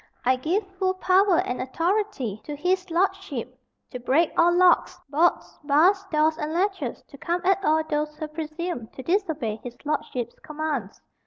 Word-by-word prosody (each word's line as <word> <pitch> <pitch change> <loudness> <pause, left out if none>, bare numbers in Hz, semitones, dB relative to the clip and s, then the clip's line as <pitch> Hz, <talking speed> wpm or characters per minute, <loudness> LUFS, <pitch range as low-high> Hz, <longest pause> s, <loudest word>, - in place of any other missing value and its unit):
I 255 +1 +4
give 340 +11 -1
full 375 -1 +1
power 375 0 +4
and 250 - -3
authority 330 - -1
to 295 - -5
his 365 +4 0
lordship 335 - -1 0.3
to 250 - -5
break 280 +7 +2
all 340 +1 +5
locks, 355 0 +4
bolts, 320 +5 +1
bars, 335 +8 +4
doors, 310 +1 +2
and 305 0 -3
latches 365 - -1
to 280 - -16
come 345 +4 -1
at 385 +1 +3
all 315 -1 +3
those 300 -1 -2
who 310 - -4
presume 310 -3 -5
to 260 - -7
disobey 320 - -1
his 245 -1 -8
lordship's 250 -5 -2
commands. 305 -8 -4
315 Hz, 160 wpm, -25 LUFS, 275-365 Hz, 0.3 s, all